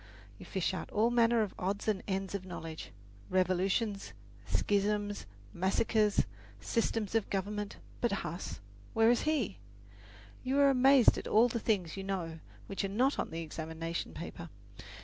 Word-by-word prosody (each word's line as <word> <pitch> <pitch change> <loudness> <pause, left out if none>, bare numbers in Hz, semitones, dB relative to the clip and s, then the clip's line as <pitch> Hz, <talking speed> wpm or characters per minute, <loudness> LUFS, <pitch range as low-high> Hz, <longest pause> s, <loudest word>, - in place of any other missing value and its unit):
You - - -10
fish 190 -1 -1
out 185 - -4
all 225 +3 +2
manner 235 -1 +4
of 205 - -4
odds 195 +3 -2
and 210 -3 +1
ends 195 -1 -2
of 200 -2 -3
knowledge 165 -3 -7 0.4
revolutions, 185 - +1 0.3
schisms, 205 - 0 0.3
massacres, 205 - +2 0.3
systems 220 - -1
of 225 -2 +1
government; 205 +1 -2 0.2
but 240 - +2
Huss 170 - -5 0.3
where 225 +1 +6
is 245 - +2
he? 245 - 0 0.8
You 260 +2 0
are 280 -1 +6
amazed 265 -1 +6
at - - -7
all 225 +3 +5
the 235 - -1
things 195 -6 0
you 195 - -4
know 175 -4 -3 0.3
which 195 - -3
are - - +1
not 255 +8 +2
on - - -1
the 165 +1 -4
examination 160 +1 -4
paper. 170 0 -7
200 Hz, 150 wpm, -32 LUFS, 185-225 Hz, 0.8 s, where